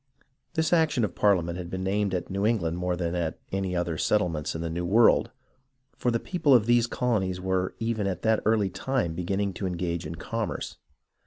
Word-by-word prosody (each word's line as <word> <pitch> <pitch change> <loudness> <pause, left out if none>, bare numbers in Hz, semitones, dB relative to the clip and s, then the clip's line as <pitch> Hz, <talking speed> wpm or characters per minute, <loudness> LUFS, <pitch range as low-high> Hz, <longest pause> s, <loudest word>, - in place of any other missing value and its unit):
This 160 +1 +1
action 155 -8 +3
of - - -6
ParHament 90 -4 +2
had 90 -2 -6
been 95 +1 -4
aimed 100 -1 0
at 90 - -3
New 100 +1 -1
Eng 115 +2 +3
land 85 0 -1
more 90 0 0
than 85 -1 -2
at 85 -3 -2
any 95 -1 -1
other 85 -2 -1
settlements 85 -9 0
in 80 - -3
the 85 - -2
New 85 +2 -3
World, 110 +4 +4 0.7
for 125 - 0
the 115 -1 +1
people 150 -5 +3
of 110 -4 +4
these 120 0 +4
colonies 100 -8 0
were 95 0 -1
even 115 -3 -1
at 95 -2 -3
that 110 -1 +3
early 105 -3 +2
time 100 -2 -1
beginning 95 +3 -1
to 95 +2 -3
engage 85 -2 -3
in 80 - -6
commerce. 115 +6 -4
95 Hz, 200 wpm, -27 LUFS, 90-115 Hz, 0.7 s, World